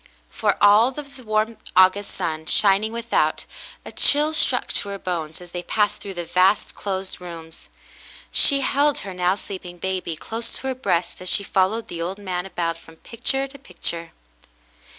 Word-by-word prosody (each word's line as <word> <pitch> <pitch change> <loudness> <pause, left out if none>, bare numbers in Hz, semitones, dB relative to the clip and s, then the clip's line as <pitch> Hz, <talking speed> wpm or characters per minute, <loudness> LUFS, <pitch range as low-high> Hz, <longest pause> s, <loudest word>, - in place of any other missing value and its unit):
For - - 0
all 205 +3 +7
of 280 -2 -8
the 255 - -13
warm 215 0 -1 0.2
August 185 +2 +4
sun 160 -1 -4
shining 205 +4 +3
without, 235 0 -1 0.4
a - - -8
chill 300 +2 +4
struck 315 - +1
to 200 - 0
her 200 - -5
bones 165 -5 -4
as 175 -1 -13
they 175 - -5
passed 210 +3 0
through 195 -2 -8
the 175 -1 -5
vast, 185 +4 +2
closed 190 -2 -5
rooms. 165 -2 -11 0.6
She 280 -1 +8
held 285 +2 +2
her 195 - -6
now 180 +1 +1
sleeping 185 -3 -8
baby 185 -2 -3
close 225 +8 -3
to - - -5
her - - -1
breast 180 -11 -2
as 185 - -4
she 200 - +1
followed 200 +4 0
the 170 - -6
old 180 +3 -3
man 185 -2 -4
about 165 -3 -3
from 160 -1 -16
picture 250 +9 -2
to 280 +1 -13
picture. 170 -7 -5
195 Hz, 175 wpm, -22 LUFS, 175-225 Hz, 0.6 s, She